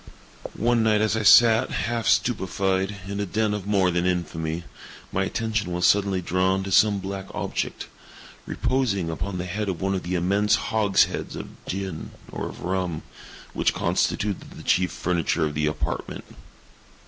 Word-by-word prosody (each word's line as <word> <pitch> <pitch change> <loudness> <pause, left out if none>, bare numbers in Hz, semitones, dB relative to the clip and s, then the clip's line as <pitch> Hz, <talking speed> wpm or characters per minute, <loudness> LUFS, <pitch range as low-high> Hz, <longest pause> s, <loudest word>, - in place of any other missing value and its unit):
One 120 +1 +2
night 110 -1 +3
as 110 0 +1
I 110 - 0
sat, 115 +3 +6
half 115 -1 -2
stupefied, 95 -3 +1
in 100 0 -4
a 100 - 0
den 110 +2 0
of 105 -2 -4
more 95 -3 +3
than 85 +1 0
infamy, 85 -2 -2 0.5
my 95 +1 0
attention 110 -3 -2
was 90 0 0
suddenly 100 -2 +3
drawn 95 +2 +1
to 95 - -5
some 105 +1 +5
black 95 0 -5
object, - - -3 0.6
reposing 110 -10 0
upon 90 +4 -4
the 90 - -3
head 100 +3 -3
of 90 - -3
one 95 +1 0
of 95 - -1
the 90 +1 -3
immense 100 +4 +2
hogsheads 105 -3 +1
of - - -6 0.2
gin, 95 -4 -4 0.2
or - - -4
of - - -11
rum, 90 -3 -2 0.5
which - - +1
constituted 100 -2 -1
the - - -11
chief 90 0 +2
furniture 85 -2 0
of 75 - -3
the 75 +1 0
apartment. 75 - -3
95 Hz, 160 wpm, -25 LUFS, 90-105 Hz, 0.6 s, sat